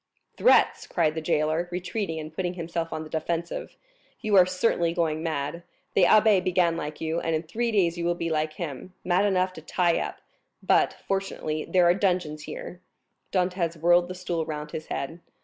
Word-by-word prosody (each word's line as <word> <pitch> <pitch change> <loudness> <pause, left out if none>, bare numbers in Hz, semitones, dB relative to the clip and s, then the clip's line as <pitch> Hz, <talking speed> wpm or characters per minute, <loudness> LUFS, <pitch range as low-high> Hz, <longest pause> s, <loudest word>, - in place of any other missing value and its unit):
"Threats!" - - +4
cried 160 -3 +1
the 160 - -4
jailer, 155 +2 0
retreating 180 -1 -3
and 155 0 -7
putting 180 +1 -2
himself 170 -1 -3
on 155 - -4
the - - -9
defensive; 170 +1 -3 0.4
"you 215 -2 +1
are 180 -2 +7
certainly 180 -3 +1
going 160 -3 0
mad. 160 0 -3 0.3
The 185 - +5
abbé 210 -1 +5
began 175 -2 +2
like 150 -2 -5
you, 160 +1 -1
and 165 -1 -1
in 155 - -2
three 230 +8 -2
days 175 -5 +2
you 170 - -2
will 175 0 +1
be 170 -1 -3
like 155 0 0
him, 165 +2 -7
mad 185 +3 +2
enough 185 -2 +1
to 160 - -10
tie 170 +2 +1
up; - - -4 0.5
but, - - +3
fortunately, 195 -5 -2
there 180 -1 +3
are 175 - +6
dungeons 175 -6 -1
here." 180 - -8 0.5
Dantès 180 -3 0
whirled 175 +2 +4
the 185 - -6
stool 175 -2 -2
round 150 -1 -5
his 155 - -6
head. 165 +5 -4
170 Hz, 185 wpm, -26 LUFS, 160-185 Hz, 0.5 s, are